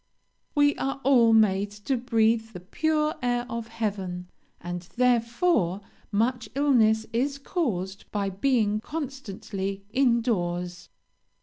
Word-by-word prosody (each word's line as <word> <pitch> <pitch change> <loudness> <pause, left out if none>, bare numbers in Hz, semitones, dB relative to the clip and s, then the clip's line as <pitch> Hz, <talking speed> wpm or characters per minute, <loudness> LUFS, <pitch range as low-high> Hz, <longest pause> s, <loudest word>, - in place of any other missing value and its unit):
"We 290 0 +4
are 270 0 -2
all 245 -4 +5
made 205 -2 +4
to 205 +6 -3
breathe 225 -2 +1
the 180 - -7
pure 305 - 0
air 245 -1 0
of 230 -2 -5
heaven, 195 -6 -4 0.3
and 175 0 -5
therefore 235 - +2 0.3
much 235 +3 0
illness 225 -6 +3
is 275 +4 0
caused 205 - -3
by 200 -2 -1
being 215 0 +1
constantly 215 -9 -5
in 245 -2 +3
doors. 175 -5 -2
225 Hz, 115 wpm, -26 LUFS, 195-260 Hz, 0.3 s, all